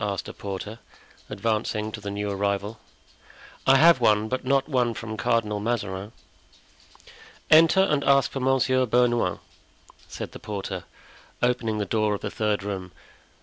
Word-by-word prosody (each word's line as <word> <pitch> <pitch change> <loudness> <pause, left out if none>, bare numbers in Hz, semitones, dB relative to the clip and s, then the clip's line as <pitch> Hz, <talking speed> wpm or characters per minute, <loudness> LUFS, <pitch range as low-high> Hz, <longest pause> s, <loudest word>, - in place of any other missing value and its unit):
asked 100 -2 -3
a - - -7
porter, 100 +3 -6 0.5
advancing 110 -1 -2
to 105 - -7
the 100 - -5
new 105 +1 -3
arrival. 100 +2 -2 0.9
"I 135 - +7
have 165 -1 +6
one, 110 -1 +3
but 130 - -2
not 135 +1 +1
one 125 -5 0
from 110 0 -6
Cardinal 110 -3 0
Mazarin." 100 -3 -3 1.4
"Enter, 165 +4 +7
and 150 -7 +1
ask 140 -1 +3
for 135 - -4
Monsieur 130 -1 +2
Bernouin," 120 -5 +2 0.7
said - - -7
the - - -10
porter, 105 -2 -5 0.6
opening 120 -3 +1
the 105 - -1
door 105 +1 0
of - - -8
the 105 - -4
third 105 -2 -1
room. 95 -3 -5
110 Hz, 145 wpm, -25 LUFS, 105-130 Hz, 1.4 s, I